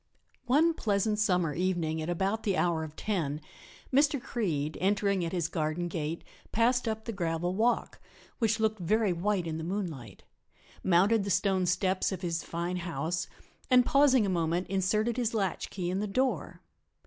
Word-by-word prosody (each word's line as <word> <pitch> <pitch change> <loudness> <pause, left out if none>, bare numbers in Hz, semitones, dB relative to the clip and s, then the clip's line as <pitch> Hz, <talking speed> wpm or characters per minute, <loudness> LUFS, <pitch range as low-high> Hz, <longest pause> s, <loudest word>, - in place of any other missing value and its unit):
One 310 +7 +4
pleasant 210 -4 0
summer 180 -7 +2
evening 170 -3 -1
at 155 - -4
about 195 +5 0
the 200 -4 0
hour 170 -2 +1
of 155 -1 -8
ten 160 -9 -2 0.5
Mr. 285 +1 +4
Creede, 160 -12 -2
entering 200 -1 +1
at 165 - -2
his 175 -4 0
garden 160 +1 -2
gate, 165 -1 -4 0.3
passed 245 +2 +2
up 220 0 -3
the 230 - -3
gravel 175 -2 -1
walk, 230 +5 0 0.4
which 225 -1 +1
looked 220 -1 +1
very 205 +2 +2
white 185 +1 0
in 160 -1 -3
the - - -5
moonlight, 165 - -5 0.6
mounted 195 +4 +4
the 200 - -3
stone 190 -1 +2
steps 185 +2 +1
of 185 -1 -5
his 165 -1 -1
fine 170 +2 -3
house 170 -1 -2 0.4
and 250 -1 +6
pausing 270 -5 +4
a - - -1
moment 170 0 0
inserted 210 +5 +1
his 235 -2 0
latchkey 190 -2 -2
in 190 - -1
the 210 - -1
door. 255 +6 -1
190 Hz, 165 wpm, -30 LUFS, 170-220 Hz, 0.6 s, and